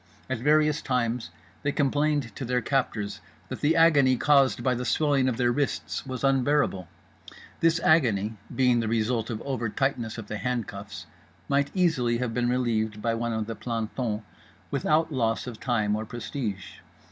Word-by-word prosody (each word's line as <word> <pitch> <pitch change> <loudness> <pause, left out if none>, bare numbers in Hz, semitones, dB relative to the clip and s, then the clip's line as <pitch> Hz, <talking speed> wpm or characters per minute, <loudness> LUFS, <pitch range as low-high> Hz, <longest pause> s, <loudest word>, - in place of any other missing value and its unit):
At 130 - -1
various 150 +3 +3
times 120 -6 -1 0.3
they 145 - 0
complained 145 -4 0
to - - -5
their 125 0 0
captors 115 -5 -2 0.3
that - - -6
the 155 +3 +3
agony 145 -6 +5
caused 140 -1 +3
by 130 - +2
the 125 0 -3
swelling 140 -1 +2
of 120 - -2
their 120 -1 +2
wrists 140 0 -2
was 130 -1 -5
unbearable—this 135 - -1
agony, 115 -11 +3 0.2
being 125 -2 +3
the 115 - -1
result 115 0 0
of 110 -2 -4
over 125 -5 -2
tightness 120 -2 -1
of 110 - -6
the 105 +1 -5
handcuffs, 105 -4 -4 0.4
might 140 0 +1
easily 145 -11 +2
have 120 -2 -2
been 120 0 0
relieved 110 -4 0
by 115 +1 0
one 115 +1 -2
of 110 -1 -2
the 115 - -4
plantons 115 -1 -3 0.5
without 160 +1 +1
loss 115 -4 0
of 120 -3 -7
time 110 -5 0
or 110 - -3
prestige. 105 -5 -5
125 Hz, 160 wpm, -27 LUFS, 110-140 Hz, 0.5 s, agony